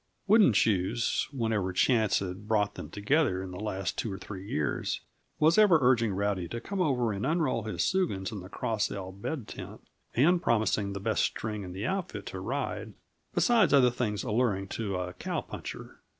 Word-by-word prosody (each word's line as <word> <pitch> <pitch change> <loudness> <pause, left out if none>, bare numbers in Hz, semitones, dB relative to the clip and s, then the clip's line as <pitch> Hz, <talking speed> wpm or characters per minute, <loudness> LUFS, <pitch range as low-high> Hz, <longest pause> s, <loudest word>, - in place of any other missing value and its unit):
Wooden 205 - +6
Shoes, 105 +2 +1
whenever 110 -8 -1
chance 110 +3 +3
had 95 +2 -5
brought 105 -2 +1
them - - -8
together 105 -2 +1
in 95 - -7
the 90 - -7
last 100 -4 -3
two 110 - -2
or 95 - -4
three 95 -1 -8
years, 75 -1 -1 0.4
was 160 +5 +4
ever 205 -6 +7
urging 125 -4 +3
Rowdy 100 -2 -1
to 115 - -5
come 195 +8 -3
over 125 -9 +1
and 100 - -4
unroll 150 -6 0
his 110 - -1
soogans 140 - 0
in 105 - -5
the 90 0 -10
Cross 110 0 -1
L 95 -1 -5
bed 105 +6 -5
tent, - - -8 0.4
and 170 +8 +4
promising 110 - +1
the 100 - -4
best 100 - 0
string 105 -1 -2
in 90 -2 -7
the 100 +4 -4
outfit 190 +3 -3
to - - -6
ride - - -3 0.4
besides 230 - +4
other 125 -3 +6
things 110 -4 -2
alluring 105 -5 0
to 105 -4 -3
a 90 0 -3
cow - - -3
puncher. - - -8
110 Hz, 185 wpm, -29 LUFS, 95-130 Hz, 0.4 s, ever